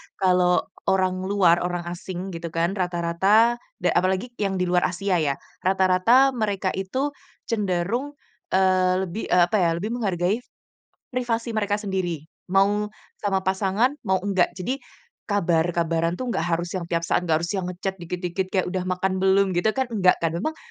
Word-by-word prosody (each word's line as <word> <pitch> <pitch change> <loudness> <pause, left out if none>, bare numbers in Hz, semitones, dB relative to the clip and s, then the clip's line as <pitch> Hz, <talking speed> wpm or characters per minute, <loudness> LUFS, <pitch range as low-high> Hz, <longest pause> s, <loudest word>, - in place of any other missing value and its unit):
kalau 180 -1 +3 0.2
orang 185 -1 +1
luar, 180 -4 +4
orang 175 -1 -2
asing 185 +2 -6
gitu 170 0 -5
kan, 170 +2 +1
rata-rata 190 +6 +2 0.2
dan - - +3
apalagi 190 +6 -1
yang 195 -2 0
di 180 - 0
luar 180 0 +2
Asia 185 0 0
ya, 140 -3 +1 0.2
rata-rata 190 +8 +4
mereka 205 -5 -1
itu 260 +10 -2 0.3
cenderung, 215 +6 -1 0.4
eee, 185 -1 +3
lebih, 190 +4 -5
eee, 180 - +5
apa 175 +5 +1
ya, 175 -2 +3
lebih 200 +6 -3
menghargai 200 -3 0 0.7
privasi 235 -2 -1
mereka 205 -2 0
sendiri. 185 -7 -3 0.2
Mau 200 +3 +2 0.3
sama 195 -2 0
pasangan, 195 +7 +1
mau 190 - +1
enggak. 190 -3 +2
Jadi, 255 +10 -3 0.5
kabar-kabaran 170 -3 +1
tuh 250 +2 -3
nggak - - -1 0.2
harus 170 0 -5
yang 175 -3 -4
tiap 170 -1 0
saat, - - +1
nggak 160 - +4
harus 170 - -3
yang 190 -3 -2
nge-chat 185 +1 -4
dikit-dikit 180 +2 -3
kayak 190 -1 0
udah 185 +1 -2
makan 185 +1 -1
belum, 190 0 +3
gitu 180 +7 +1
kan 265 - +2
enggak 185 -4 +4
kan, 165 - +1
memang, 270 - -2
190 Hz, 160 wpm, -24 LUFS, 175-205 Hz, 0.7 s, eee